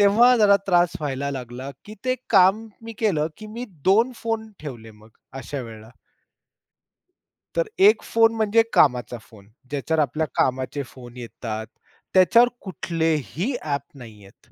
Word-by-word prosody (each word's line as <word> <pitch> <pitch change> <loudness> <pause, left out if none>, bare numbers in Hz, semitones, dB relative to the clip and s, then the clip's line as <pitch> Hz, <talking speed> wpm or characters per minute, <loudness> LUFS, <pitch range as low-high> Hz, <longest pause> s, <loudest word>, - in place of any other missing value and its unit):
तेव्हा 230 +5 +6
जरा 205 -2 +6
त्रास 175 -2 +3
व्हायला 140 -1 -3
लागला, 125 +1 -7 0.2
की 210 - -9
ते 255 0 +1 0.2
काम 195 +2 +4 0.2
मी 230 - -8
केलं, 175 -9 +1
की 215 - -10
मी 245 - -4 0.2
2 225 +7 +4
फोन 225 -1 -3
ठेवले 120 -7 -8
मग 110 +1 -19 0.3
अशा 140 +2 -5
वेळेला. 110 -1 -11 1.7
तर - - +1 0.2
1 430 - +4
फोन 225 0 +3
म्हणजे 220 +1 +3
कामाचा 125 -3 +3
फोन, 105 -3 -18 0.2
ज्याच्यावर 150 +3 0
आपल्या 155 +3 -1
कामाचे 130 +2 0
फोन 125 -2 -13
येतात. 110 -2 -6 0.5
त्याच्यावर 230 +6 +6
कुठलेही 170 - -2
ॲप 145 -2 -2
नाही 115 -5 -12
आहेत. 95 - -21
155 Hz, 140 wpm, -23 LUFS, -, 1.7 s, तेव्हा